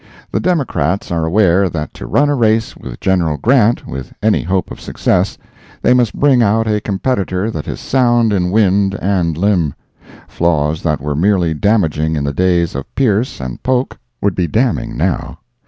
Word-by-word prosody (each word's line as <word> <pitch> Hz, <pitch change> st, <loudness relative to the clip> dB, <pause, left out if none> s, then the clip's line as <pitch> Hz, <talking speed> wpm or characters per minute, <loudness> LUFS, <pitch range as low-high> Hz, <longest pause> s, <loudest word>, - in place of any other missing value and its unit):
The -, -, 0 dB
Democrats 110 Hz, -, -1 dB
are 80 Hz, -2 st, 0 dB
aware 95 Hz, 0 st, +3 dB
that 80 Hz, -2 st, -5 dB
to -, -, -9 dB
run 145 Hz, -, +2 dB
a 145 Hz, -, +1 dB
race 115 Hz, -3 st, +1 dB
with -, -, -9 dB
General 85 Hz, -5 st, +1 dB
Grant, 120 Hz, -, +2 dB
with 65 Hz, 0 st, -7 dB
any -, -, +3 dB
hope 90 Hz, +1 st, -2 dB
of -, -, -9 dB
success, -, -, 0 dB, 0.5 s
they -, -, +4 dB
must 125 Hz, -4 st, +1 dB
bring 135 Hz, -4 st, +4 dB
out 110 Hz, +1 st, +2 dB
a 105 Hz, -1 st, 0 dB
competitor 100 Hz, -1 st, -1 dB
that 75 Hz, -, -6 dB
is -, -, -5 dB
sound 120 Hz, -4 st, +2 dB
in 90 Hz, -2 st, 0 dB
wind 100 Hz, -1 st, +2 dB
and 90 Hz, -5 st, 0 dB
limb; 90 Hz, -6 st, +1 dB, 0.5 s
flaws 80 Hz, -2 st, 0 dB
that 75 Hz, -3 st, -1 dB
were 75 Hz, +1 st, -2 dB
merely 90 Hz, 0 st, +2 dB
damaging 80 Hz, -4 st, +1 dB
in 75 Hz, -, -2 dB
the 70 Hz, 0 st, -2 dB
days 90 Hz, 0 st, +1 dB
of 70 Hz, 0 st, -7 dB
Pierce 120 Hz, -2 st, 0 dB
and 65 Hz, -2 st, -6 dB
Polk 130 Hz, 0 st, -1 dB, 0.2 s
would 100 Hz, -2 st, +1 dB
be 90 Hz, -2 st, -1 dB
damning 115 Hz, +4 st, -1 dB
now. -, -, -2 dB
95 Hz, 175 wpm, -16 LUFS, 80-115 Hz, 0.5 s, they